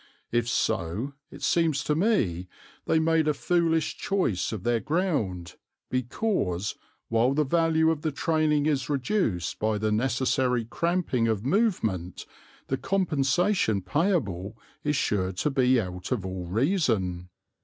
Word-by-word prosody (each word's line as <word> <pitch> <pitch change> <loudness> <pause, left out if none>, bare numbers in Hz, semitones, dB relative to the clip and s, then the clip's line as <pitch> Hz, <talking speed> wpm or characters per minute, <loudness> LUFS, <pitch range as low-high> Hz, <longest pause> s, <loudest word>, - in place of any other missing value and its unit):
If 120 -1 +1
so, 105 +8 -1 0.2
it - - -11
seems 160 -5 +2
to 150 - +1
me, 130 - +1 0.4
they - - +3
made 160 -1 +2
a 150 - +2
foolish 165 0 +1
choice 185 - 0
of 105 -5 -5
their 120 -1 +2
ground, 110 - -2 0.3
because, 120 - -1 0.4
while 115 +4 +2
the 150 - +3
value 160 +2 +2
of 155 -2 -3
the 155 - -1
training 155 -1 +1
is 140 -3 0
reduced 135 - -1
by 110 0 +1
the 110 +1 0
necessary 125 +1 +1
cramping 165 -4 0
of 110 -1 -1
movement, 130 - 0 0.4
the 135 - -1
compensation 175 - +1
payable 115 - -1 0.3
is 150 0 +1
sure 95 -7 0
to 145 +11 -1
be 130 -2 +3
out 90 -1 -5
of 110 -7 -1
all 95 -2 -5
reason." 105 - 0
130 Hz, 135 wpm, -27 LUFS, 105-160 Hz, 0.4 s, they